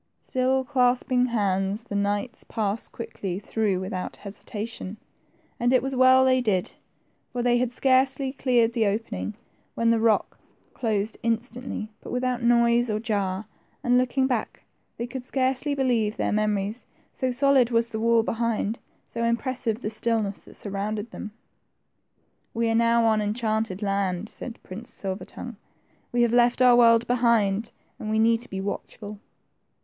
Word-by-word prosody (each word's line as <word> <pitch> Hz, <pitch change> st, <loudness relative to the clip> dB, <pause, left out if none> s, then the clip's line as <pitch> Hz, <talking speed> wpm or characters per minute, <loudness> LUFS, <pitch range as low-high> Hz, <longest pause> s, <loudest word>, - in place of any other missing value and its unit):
Still 260 Hz, +1 st, 0 dB
clasping 250 Hz, -1 st, +2 dB
hands, 200 Hz, -2 st, 0 dB
the 210 Hz, -, -6 dB
knights 205 Hz, +4 st, -1 dB
passed 215 Hz, -1 st, -3 dB
quickly 205 Hz, -5 st, -5 dB
through 205 Hz, -1 st, -1 dB
without 185 Hz, -1 st, -4 dB
hesitation; 205 Hz, 0 st, -7 dB, 0.6 s
and 240 Hz, +1 st, +2 dB
it 255 Hz, -, +4 dB
was 270 Hz, 0 st, -2 dB
well 260 Hz, +1 st, +6 dB
they 255 Hz, -1 st, +4 dB
did, 195 Hz, -6 st, 0 dB, 0.6 s
for 245 Hz, -1 st, -2 dB
they 240 Hz, 0 st, +3 dB
had 250 Hz, -1 st, 0 dB
scarcely 265 Hz, +1 st, +2 dB
cleared 245 Hz, -4 st, +2 dB
the 225 Hz, -3 st, +2 dB
opening 215 Hz, 0 st, -3 dB, 0.4 s
when 230 Hz, 0 st, +2 dB
the 230 Hz, -, +3 dB
rock 225 Hz, -1 st, +1 dB, 0.3 s
closed 215 Hz, -3 st, -1 dB
instantly 230 Hz, -1 st, -3 dB
but -, -, -9 dB
without 250 Hz, 0 st, -1 dB
noise 235 Hz, 0 st, +3 dB
or 215 Hz, 0 st, 0 dB
jar, 205 Hz, -3 st, -1 dB, 0.4 s
and 245 Hz, 0 st, +4 dB
looking 255 Hz, +1 st, +1 dB
back, 250 Hz, -4 st, -2 dB, 0.3 s
they 235 Hz, -, -2 dB
could 250 Hz, +1 st, -6 dB
scarcely 265 Hz, +2 st, 0 dB
believe 235 Hz, -5 st, +1 dB
their -, -, 0 dB
memories, 210 Hz, +1 st, -1 dB, 0.3 s
so 260 Hz, -, -1 dB
solid 265 Hz, -1 st, +3 dB
was 230 Hz, -1 st, +1 dB
the 220 Hz, -, -4 dB
wall 230 Hz, 0 st, +3 dB
behind, 230 Hz, -1 st, -1 dB, 0.3 s
so 235 Hz, -, -4 dB
impressive 235 Hz, -1 st, -1 dB
the 215 Hz, -, -3 dB
stillness 220 Hz, -2 st, -1 dB
that -, -, -16 dB
surrounded 210 Hz, +2 st, -4 dB
them. 215 Hz, -, -7 dB, 1.3 s
We 230 Hz, 0 st, +1 dB
are -, -, +1 dB
now 230 Hz, 0 st, +3 dB
on 220 Hz, -1 st, +3 dB
enchanted 215 Hz, -2 st, -1 dB
land," 195 Hz, 0 st, -1 dB
said 240 Hz, -, -8 dB
Prince 215 Hz, +6 st, -9 dB
Silver 190 Hz, 0 st, -5 dB
tongue; 240 Hz, -4 st, -9 dB, 0.5 s
we 240 Hz, 0 st, +3 dB
have 235 Hz, -1 st, +2 dB
left 240 Hz, 0 st, +4 dB
our 250 Hz, -1 st, +7 dB
world 230 Hz, -1 st, +6 dB
behind, 230 Hz, -3 st, +2 dB, 0.3 s
and 215 Hz, -, -5 dB
we 220 Hz, -, +1 dB
need 225 Hz, +1 st, +3 dB
to 245 Hz, -, -11 dB
be 190 Hz, -, -4 dB
watchful." 205 Hz, +1 st, -6 dB
230 Hz, 155 wpm, -25 LUFS, 210-245 Hz, 1.3 s, our